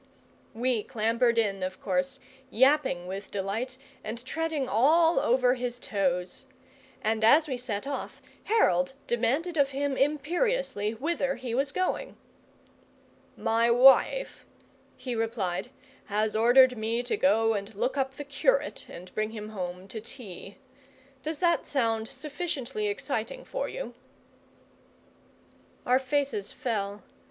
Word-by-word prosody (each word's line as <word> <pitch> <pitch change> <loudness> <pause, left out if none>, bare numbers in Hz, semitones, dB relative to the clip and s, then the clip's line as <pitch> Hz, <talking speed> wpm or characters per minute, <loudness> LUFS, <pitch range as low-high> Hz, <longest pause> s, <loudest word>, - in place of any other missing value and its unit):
We 240 -1 +1
clambered 230 +1 +1
in, 200 -4 +1
of 185 0 -4
course, 270 0 -1 0.3
yapping 260 -8 +3
with 195 +2 -6
delight 215 +6 -3 0.3
and 230 +3 -6
treading 320 -1 -2
all 320 +10 +4
over 250 +1 +3
his 245 -1 -4
toes; 185 +1 -1 0.6
and 220 0 0
as 300 +8 +6
we 265 - -2
set 230 -2 -3
off, 280 0 -5 0.3
Harold 180 - +3
demanded 270 +9 0
of 280 -2 +4
him 280 0 -1
imperiously 300 - 0
whither 275 +1 -1
he 245 -3 -5
was 275 +3 0
going. 370 +9 -2 1.2
"My 230 +1 +2
wife," 265 - +5 0.5
he 255 -1 -4
replied, 225 -6 -2 0.4
"has 210 +1 0
ordered 250 +3 +6
me 230 +2 -1
to 245 - -1
go 225 - +3
and 200 0 -4
look 250 +7 -1
up 265 -1 -1
the 290 - -6
curate 395 - 0
and 180 +1 -10
bring 215 0 -1
him 215 -1 -7
home 180 -2 -5
to 220 - -6
tea. 205 -4 -9 0.6
Does 310 +3 -3
that 340 -1 +2
sound 225 -5 0
sufficiently 295 - -4
exciting 415 +4 -3
for - - -3
you?" - - -6 1.9
Our 250 +1 +4
faces 265 -6 -1
fell. 205 -4 -3
250 Hz, 125 wpm, -28 LUFS, 215-285 Hz, 1.9 s, as